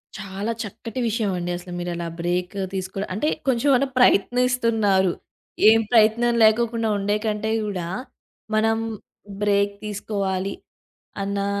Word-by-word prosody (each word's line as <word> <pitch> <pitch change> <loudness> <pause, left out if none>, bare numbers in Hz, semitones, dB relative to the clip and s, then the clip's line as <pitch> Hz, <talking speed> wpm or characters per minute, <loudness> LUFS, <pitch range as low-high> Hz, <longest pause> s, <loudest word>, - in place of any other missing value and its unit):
చాలా 195 +2 -4
చక్కటి 225 +3 -7
విషయం 220 -2 0
అండి 175 0 -3
అసల 180 +1 -8
మీరలా 175 -1 -3
బ్రేక్ 180 +2 -1 0.2
తీసుకో 190 0 -4 0.2
అంటే, 215 +11 -1 0.2
కొంచెమన్నా 265 +1 +3
ప్రయత్నిస్తున్నారు. 230 -5 +3 0.6
ఏం 225 +1 +6
ప్రయత్నం 235 +1 +4
లేకోకుండా 225 +1 +3
ఉండేకంటే 210 +1 -1 0.2
గూడా, 185 -5 -3 0.7
మనం 225 +1 +2 0.7
బ్రేక్ 200 0 +2
తీసుకోవాలి. 200 -2 -2 0.7
అన్నా 200 0 -1
210 Hz, 105 wpm, -23 LUFS, 190-225 Hz, 0.7 s, ఏం